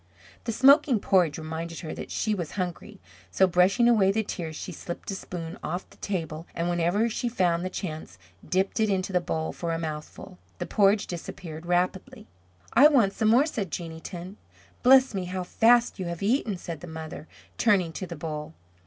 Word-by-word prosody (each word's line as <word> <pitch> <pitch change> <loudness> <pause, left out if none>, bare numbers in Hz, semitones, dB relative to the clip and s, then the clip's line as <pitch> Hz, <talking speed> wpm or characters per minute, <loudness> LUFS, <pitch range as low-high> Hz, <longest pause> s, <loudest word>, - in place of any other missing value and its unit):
The 230 - -1
smoking 270 0 +5
porridge 180 -6 +2
reminded 160 +1 -5
her 160 -3 -5
that - - -7
she 215 - -1
was 175 -6 -4
hungry; 180 -4 -5 0.3
so 190 - +4
brushing 185 +6 +3
away 210 -5 +5
the 220 +2 0
tears 165 -6 -5
she 180 - -6
slipped 175 +3 -6
a - - -3
spoon 175 0 -6
off 175 +4 -4
the - - -18
table 165 -4 -4
and 170 +1 -1
whenever 175 +6 +1
she 240 +2 -2
found 175 -6 +1
the 185 - -2
chance, 160 - -6 0.3
dipped 190 +3 0
it 220 -1 +2
into 190 -1 -1
the 180 - +3
bowl 160 -2 -3
for 170 -1 -3
a 165 - -1
mouthful. 160 +3 -7 0.2
The - - -3
porridge 205 0 +3
disappeared 170 -1 -7
rapidly. 180 +1 -1 0.5
"I 280 +4 +8
want 240 -10 +3
some 220 - 0
more," 240 +6 +5
said 215 - -3
Jeanneton. 170 +3 -7 0.4
"Bless 260 -1 +6
me, 190 -2 -2
how 185 +1 -3
fast 235 +5 +3
you 185 - -3
have 170 +2 -5
eaten," 215 -2 +1
said 170 -3 -7
the 175 - -8
mother, 160 -1 -8 0.3
turning 195 -7 +3
to 185 - -5
the 170 - -6
bowl. 155 0 -6
180 Hz, 190 wpm, -27 LUFS, 165-210 Hz, 0.5 s, I